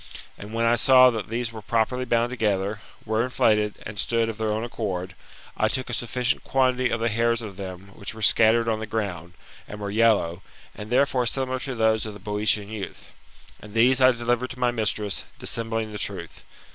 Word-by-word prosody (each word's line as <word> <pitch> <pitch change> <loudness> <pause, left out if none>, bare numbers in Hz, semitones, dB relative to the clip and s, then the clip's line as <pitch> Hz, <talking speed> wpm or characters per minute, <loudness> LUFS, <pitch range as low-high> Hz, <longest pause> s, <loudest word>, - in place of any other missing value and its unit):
And 105 +1 -10
when 115 +1 0
I 120 +1 +3
saw 130 +1 +7
that 110 -4 -5
these 115 +1 -2
were 110 - -7
properly 115 +4 0
bound 120 0 +1
together, 105 -3 -1 0.2
were 110 0 +1
inflated, 105 -4 +1
and 105 -1 -6
stood 115 0 +1
of 110 -1 -6
their 110 -1 0
own 110 +1 -1
accord, 95 -6 -4 0.4
I - - +2
took 130 -1 -2
a - - -4
sufficient 120 +2 -1
quantity 130 -1 +1
of 115 - -1
the 115 - +2
hairs 115 +1 +1
of 100 -3 -7
them 95 0 -8
which 100 +3 -6
were 110 - -7
scattered 115 +2 +5
on 110 -1 0
the 110 - -5
ground, 95 -6 -4 0.3
and 105 - -8
were 100 -1 -4
yellow, 105 -6 +2 0.3
and 105 0 -9
therefore 125 0 +2
similar 130 +1 -2
to 130 -1 -5
those 110 -1 +2
of 105 - -7
the - - -10
Boeotian 105 0 -1
youth: 105 -3 -7 0.5
and 105 -1 -12
these 125 +3 +4
I 130 - +8
delivered 120 0 0
to 125 - -9
my 125 -1 +2
mistress, 105 -3 -2
dissembling 115 -1 -2
the 105 - -6
truth. 90 -5 -5
110 Hz, 200 wpm, -25 LUFS, 105-120 Hz, 0.5 s, I